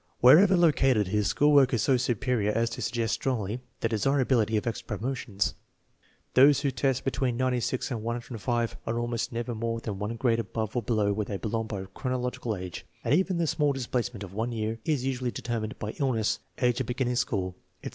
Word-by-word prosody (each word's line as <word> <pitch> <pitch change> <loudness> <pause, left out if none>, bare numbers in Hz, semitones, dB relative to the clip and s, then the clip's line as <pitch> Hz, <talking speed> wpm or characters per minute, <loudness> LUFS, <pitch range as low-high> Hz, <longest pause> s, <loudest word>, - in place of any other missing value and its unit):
Wherever 185 +10 +7
lo 170 -2 +6
cated, 130 -7 +2
his 105 0 +1
school 150 +6 +3
work 135 -3 +5
is 115 - 0
so 135 - +4
superior 120 -3 0
as 115 +2 0
to - - -5
suggest 115 -2 -1
strongly 120 -3 -2 0.2
the 115 - +1
desirability 115 -1 +2
of 105 - -2
extra 110 -2 -3
promotions. 115 -4 -2 0.8
Those 140 +2 +6
who 140 -2 +1
test 135 0 0
be 135 - +1
tween 125 -1 -1
96 130 0 0
and 115 -3 -2
105 115 0 -2
are 115 +1 0
almost 120 +1 -2
never 120 +1 -3
more 115 +1 -2
than 105 -4 -5
one 105 +3 -3
grade 115 -1 +1
above 110 -1 -3
or 120 - +1
below 105 -2 +1
where 105 +1 -2
they 100 - -4
belong 110 +1 -2
by 100 -3 -4
chronological 125 -3 -2
age, 90 -2 -7 0.2
and - - +1
even 185 +2 +2
the 170 - +1
small 150 -2 +1
displacement 120 -4 -3
of 95 -1 -9
one 115 +4 -2
year 110 0 -2
is 145 -5 0
usually 130 -2 -1
determined 115 -1 -4
by 105 - -4
illness, 120 -6 +1 0.2
age 125 +1 +2
of 125 - -4
beginning 125 0 -1
school, 95 -7 -1 0.3
etc. - - -4
120 Hz, 200 wpm, -28 LUFS, 110-130 Hz, 0.8 s, Wherever